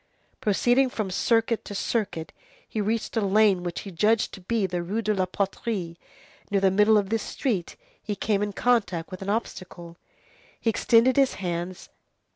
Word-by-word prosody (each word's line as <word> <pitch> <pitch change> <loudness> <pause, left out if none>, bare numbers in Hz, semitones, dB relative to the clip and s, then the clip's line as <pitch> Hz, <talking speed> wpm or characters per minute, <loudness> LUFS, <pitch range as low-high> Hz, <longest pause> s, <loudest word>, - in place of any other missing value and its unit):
Proceeding 245 +6 +3
from 215 -6 -3
circuit 225 +3 +1
to 205 - -7
circuit, 195 -7 -2 0.3
he 215 - -3
reached 220 +3 -2
a 225 - +2
lane 200 -1 +3
which 175 -1 -4
he 195 - -8
judged 210 +6 +2
to 190 - -9
be 220 +2 0
the 180 -1 -2
Rue 205 +7 -2
de 215 0 +1
la 185 -2 0
Poterie; 195 -2 -3 0.5
near 200 - +2
the 190 -1 +3
middle 210 +3 +5
of 200 -2 0
this 225 -1 +1
street, 205 -9 -2 0.3
he 210 - -4
came 205 0 0
in 205 0 -1
contact 200 -7 0
with 185 - -7
an 195 - -4
obstacle. 180 -5 -4 0.6
He 225 - +1
extended 235 +4 +4
his 270 -2 +3
hands. 175 0 -4
205 Hz, 175 wpm, -26 LUFS, 185-225 Hz, 0.6 s, middle